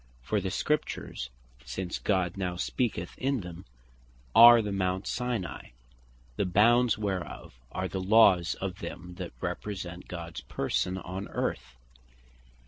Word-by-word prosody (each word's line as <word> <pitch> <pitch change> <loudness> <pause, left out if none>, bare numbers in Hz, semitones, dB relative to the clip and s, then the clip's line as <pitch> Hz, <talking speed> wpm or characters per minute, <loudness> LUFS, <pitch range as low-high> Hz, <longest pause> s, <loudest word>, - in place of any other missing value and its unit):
For 105 - 0
the 95 - -2
Scriptures 100 - -2 0.3
since 90 +6 -4
God 95 -3 0
now 90 -2 -2
speaketh 90 -2 -2
in 135 -2 0
them, 90 0 -9 0.7
are 120 0 +10
the 105 - -3
Mount 95 0 -1
Sinai; 120 - -3 0.6
the - - +1
bounds 115 +5 +4
whereof 95 - -4
are 95 - -2
the 95 0 -4
Laws 95 -3 +5
of 95 0 -5
them 90 0 -7
that - - -5
represent 90 -4 -5
Gods 85 -2 -6
Person 90 +7 -1
on 95 +1 -5
Earth. - - -3
95 Hz, 130 wpm, -29 LUFS, 90-105 Hz, 0.7 s, are